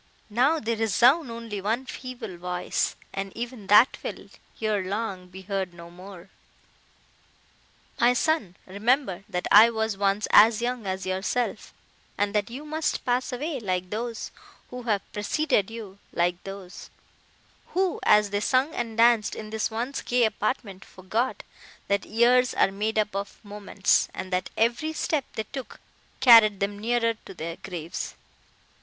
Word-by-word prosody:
Now, 265 +9 +3
they 230 -2 -1
resound 240 - +3
only 230 -3 -6
one 225 +6 -1
feeble 245 -8 -7
voice—and 180 +2 -3
even 235 -3 -6
that 210 +6 +6
will, - - -7 0.3
ere 215 -3 0
long, 195 -1 -4
be 190 +1 -11
heard 190 -2 -3
no 170 0 -11
more! 185 +1 -12 1.7
My 240 +1 +5
son, 250 - 0
remember, 205 0 0
that 180 -3 -3
I 220 +3 +9
was 220 -2 -2
once 200 +1 +1
as 220 +1 +7
young 240 -3 -3
as 190 0 -3
yourself, 190 +6 -2 0.5
and 205 0 0
that 210 +1 0
you 265 +6 -8
must 310 +1 -2
pass 250 +2 0
away 280 +3 -3
like 185 -4 -3
those, 230 +1 -4 0.4
who 250 0 -6
have 205 -2 +1
preceded 210 0 0
you—like 190 -5 -3
those, 195 -2 -9 0.9
who, 375 -1 +1
as 210 -1 +4
they 205 - 0
sung 260 +7 +1
and 230 -2 -4
danced 230 -2 +4
in 215 0 -8
this 220 -1 -1
once 240 +5 -3
gay 245 0 +1
apartment, 215 -3 -3
forgot, 215 +7 -3 0.5
that 200 0 +1
years 245 +3 +3
are - - +3
made 215 +3 -2
up 210 -2 0
of 200 0 -4
moments, 205 -1 +1
and 185 0 -6
that 180 - -1
every 245 +8 +1
step 310 -3 -1
they 220 - -3
took 265 -2 -7 0.4
carried 225 -5 +8
them 200 +1 -2
nearer 230 +1 +1
to - - -10
their 165 0 -5
graves. 170 -3 -6
215 Hz, 150 wpm, -26 LUFS, 195-240 Hz, 1.7 s, I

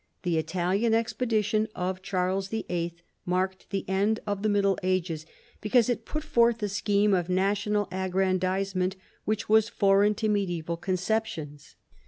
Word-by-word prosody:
The 170 -3 +1
Italian 185 +7 +1
expedition 220 -2 0
of 185 +1 -2
Charles 190 +1 -1
YIII. 175 -6 -3 0.3
marked 185 +1 -2
the 195 -1 -3
end 200 +4 +1
of 205 -1 -2
the 215 - +1
Middle 200 -2 +2
Ages, 175 -4 -1 0.3
because 230 +2 +3
it 230 -2 -1
put 305 0 -4
forth 235 -6 +2
a 205 - 0
scheme 205 +1 +2
of 180 -2 +1
national 205 +2 +1
aggrandisement 185 0 0 0.3
which 215 +1 -1
was 220 +1 +4
foreign 200 0 +3
to 220 - -1
medisBval 175 -5 -1
conceptions. 180 -5 -2
195 Hz, 140 wpm, -27 LUFS, 185-215 Hz, 0.3 s, was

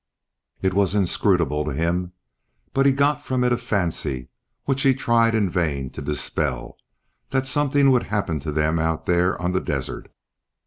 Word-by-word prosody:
It 95 - +2
was 100 0 +1
inscrutable 85 -6 +1
to 75 -1 -3
him, 85 +4 -1 0.6
but 135 +1 +3
he - - +6
got 145 +2 +1
from 130 -3 -1
it 125 0 +3
a - - +1
fancy, 80 - -2 0.3
which 135 -1 -1
he 135 -3 +4
tried 115 -2 +2
in 105 -3 +2
vain 75 -7 -1
to - - -8
dispel, 70 -3 -3 0.5
that 130 0 0
something 140 0 +3
would 125 -2 +2
happen 95 -7 -1
to 75 +2 -4
them 80 +2 +1
out 80 0 -1
there 90 0 +2
on 90 0 -1
the 95 - 0
desert. - - -4
95 Hz, 170 wpm, -23 LUFS, 80-125 Hz, 0.6 s, he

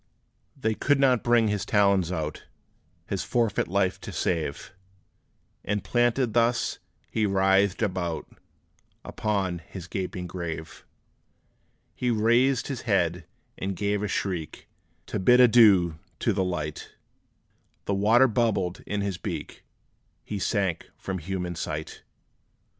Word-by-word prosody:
They 110 0 +1
could 140 +5 +1
not 130 -4 +3
bring 120 -2 +4
his 105 -2 -1
talons 100 -4 +2
out, 75 -3 -4 0.6
His 95 0 -3
forfeit 110 +3 0
life 95 0 0
to - - -7
save; 80 -5 -2 0.9
And 100 -1 -2
planted 120 +2 +1
thus, 120 +1 +1 0.3
he 110 -1 +1
writhed 95 +1 +2
about 90 -5 -2 0.8
Upon 95 -5 -1
his 85 +1 -10
gaping 90 0 -4
grave. 85 -3 -6 1.1
He 125 - -1
raised 120 +3 +3
his 135 -4 -4
head, 90 -6 0 0.3
and 95 0 -3
gave 100 +1 -1
a 105 - -1
shriek, 90 -6 -3 0.4
To - - -3
bid 125 +6 +5
adieu 105 -9 +6 0.2
to 115 - +1
light: 90 -6 -3 0.9
The 100 - 0
water 110 +6 +5
bubbled 105 -6 0
in 105 0 -1
his 100 -3 -3
beak - - -6 0.6
He 105 - -5
sank 95 -4 -1
from 95 -1 -4
human 90 +1 -4
sight! 80 -2 -5
100 Hz, 120 wpm, -26 LUFS, 90-115 Hz, 1.1 s, adieu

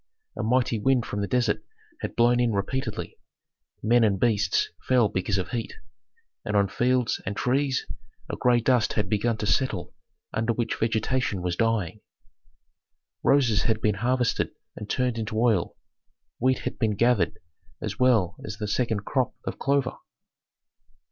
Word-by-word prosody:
A - - -3
mighty 120 0 +1
wind 125 +2 +2
from 100 - -3
the 100 - -1
desert 120 -3 +1 0.4
had - - -5
blown 120 +1 +4
in 120 -2 +2
repeatedly; 100 +7 -3 0.6
men 120 +2 +4
and 100 -3 +2
beasts 110 -3 +2 0.2
fell 125 -5 +4
because 95 +1 -1
of 95 - -2
heat, 115 -2 -4 0.7
and 105 - -2
on 100 -1 +3
fields 125 -1 +1
and 100 +1 -4
trees 135 +1 +1 0.4
a - - -4
gray 120 -1 +3
dust 125 -2 +2
had 105 -2 0
begun 110 +2 +1
to 105 - -3
settle 130 +5 0 0.4
under 115 +2 0
which 115 0 -1
vegetation 110 -3 0
was 90 -1 -1
dying. 110 -3 0 1.2
Roses 125 -7 +3
had 110 -2 +1
been 105 -1 +2
harvested 125 0 +1 0.3
and 105 - -8
turned 125 -2 0
into 110 0 -2
oil; 110 -7 +1 0.6
wheat 130 +1 +2
had - - -4
been 110 -3 +1
gathered 110 -6 +2 0.4
as 105 -1 -5
well 110 -8 +3
as 110 -1 -6
the 105 -1 -3
second 110 -2 -1
crop 130 -3 0
of - - -5
clover. 140 -2 +1
115 Hz, 155 wpm, -26 LUFS, 105-125 Hz, 1.2 s, blown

